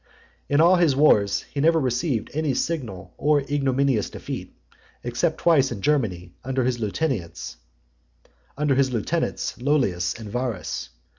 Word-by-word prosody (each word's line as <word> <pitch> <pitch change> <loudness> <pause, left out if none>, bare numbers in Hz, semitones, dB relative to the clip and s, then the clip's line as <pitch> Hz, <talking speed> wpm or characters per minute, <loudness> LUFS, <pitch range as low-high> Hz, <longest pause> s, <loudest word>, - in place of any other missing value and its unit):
XXIII. 145 - -1
In 150 - +5
all 175 +3 +6
his 165 -6 +3
wars, 105 -9 +4
he 140 - -7
never 165 +2 +4
received 130 -2 -1
any 150 -3 0
signal 105 - -3
or 150 -1 +3
ignominious 135 -4 0
defeat, - - -7 0.5
except 120 +7 0
twice 145 -6 +3
in 110 - -4
Germany, 100 -9 0
under 130 0 -1
his 125 -1 0
lieutenants 105 - -3 1.0
Lollius 130 - 0
and 110 - -8
Varus. 125 - -3
135 Hz, 125 wpm, -24 LUFS, 115-150 Hz, 1.0 s, all